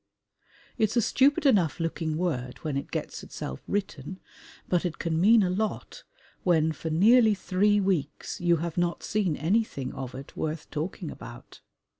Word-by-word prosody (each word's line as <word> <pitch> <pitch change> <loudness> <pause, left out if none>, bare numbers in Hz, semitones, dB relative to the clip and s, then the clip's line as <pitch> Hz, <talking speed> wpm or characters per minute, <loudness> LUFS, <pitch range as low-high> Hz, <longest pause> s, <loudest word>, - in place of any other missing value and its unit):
It's 220 +2 +2
a - - +7
stupid 280 +6 +3
enough 190 - +3
looking 165 -1 -2
word 130 -8 -2
when 155 -4 -2
it 140 - -3
gets - - -4
itself 65 - -7
written, 185 -3 -3 0.5
but 175 -2 +1
it 175 -3 -3
can 165 -1 -1
mean 215 +3 +6
a 180 - +1
lot 215 - -3 0.4
when 160 -3 +3
for 160 +1 -5
nearly 215 +7 +5
three 205 +2 +2
weeks 185 -7 -2
you 175 -1 +4
have 170 +1 -3
not 175 -1 -1
seen 195 -8 0
anything 160 - 0
of 130 -1 -6
it 135 +1 -10
worth 155 0 -3
talking 165 +2 -4
about. 120 +2 -11
175 Hz, 160 wpm, -27 LUFS, 155-205 Hz, 0.5 s, a